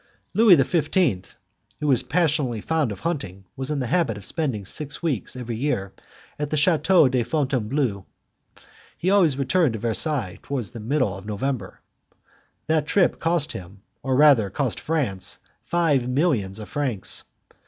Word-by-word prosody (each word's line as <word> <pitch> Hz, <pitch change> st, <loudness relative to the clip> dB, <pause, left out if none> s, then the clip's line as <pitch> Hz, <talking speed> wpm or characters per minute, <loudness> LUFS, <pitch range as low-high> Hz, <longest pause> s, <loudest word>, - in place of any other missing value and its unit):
Louis 220 Hz, -4 st, +7 dB
XV., 150 Hz, -, 0 dB, 0.4 s
who -, -, -4 dB
was 135 Hz, -5 st, +5 dB
passionately 150 Hz, -8 st, 0 dB
fond 155 Hz, 0 st, 0 dB
of 100 Hz, -, -8 dB
hunting, 135 Hz, -, -4 dB
was 135 Hz, +1 st, -5 dB
in 150 Hz, -, -1 dB
the 130 Hz, -, -1 dB
habit 125 Hz, -5 st, 0 dB
of 100 Hz, -, -9 dB
spending 125 Hz, -, -2 dB
six 150 Hz, -, -3 dB
weeks 130 Hz, -, -2 dB
every 120 Hz, -2 st, -5 dB
year 110 Hz, -8 st, -2 dB, 0.5 s
at 150 Hz, -1 st, -2 dB
the 155 Hz, -, -1 dB
Chateau 165 Hz, +2 st, +4 dB
of 125 Hz, -3 st, +1 dB
Fontainebleau. 130 Hz, -, -1 dB, 0.9 s
He 185 Hz, -, 0 dB
always 170 Hz, -9 st, +4 dB
returned 140 Hz, 0 st, +2 dB
to 110 Hz, -, -4 dB
Versailles 115 Hz, -, -1 dB
towards 130 Hz, -7 st, -3 dB
the 120 Hz, -, -8 dB
middle 115 Hz, -3 st, 0 dB
of 95 Hz, +2 st, -10 dB
November. 110 Hz, -1 st, -3 dB, 0.8 s
That 155 Hz, -1 st, +1 dB
trip 175 Hz, +3 st, +2 dB
cost 165 Hz, -2 st, 0 dB
him, 95 Hz, +2 st, -10 dB, 0.2 s
or 130 Hz, -1 st, 0 dB
rather 135 Hz, -8 st, +5 dB
cost 125 Hz, +4 st, -2 dB
France, 135 Hz, -, -1 dB, 0.3 s
five 150 Hz, -8 st, +1 dB
millions 125 Hz, -, 0 dB
of 105 Hz, -1 st, -7 dB
francs. 130 Hz, -10 st, -2 dB
135 Hz, 155 wpm, -24 LUFS, 110-155 Hz, 0.9 s, Louis